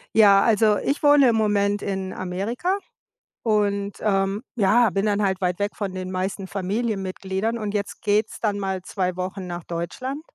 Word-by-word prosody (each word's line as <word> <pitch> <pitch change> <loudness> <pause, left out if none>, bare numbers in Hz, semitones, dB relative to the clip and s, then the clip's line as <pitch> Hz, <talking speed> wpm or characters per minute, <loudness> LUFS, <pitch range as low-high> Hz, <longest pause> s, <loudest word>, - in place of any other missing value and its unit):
Ja, 200 -3 +7
also 215 -2 +4
ich 280 +7 -1
wohne 290 -3 +6
im 230 - +2
Moment 205 -1 +1
in 190 -1 -3
Amerika 210 - -2 0.7
und, 205 -2 +1
ähm, 195 +1 0
ja, 225 +2 +4
bin 195 +2 0
dann 205 0 +1
halt 190 -1 0
weit 180 -1 0
weg 205 +1 -1
von 200 -3 -4
den 185 0 -5
meisten 190 +1 -3
Familienmitgliedern 195 +1 -2
und 210 -2 -4
jetzt 200 -1 -3
geht's 210 +1 +1
dann 205 -2 0
mal 190 -1 -2
2 185 -2 -2
Wochen 185 +1 -4
nach 175 -1 -5
Deutschland, 255 - -4
200 Hz, 170 wpm, -23 LUFS, 190-215 Hz, 0.7 s, Ja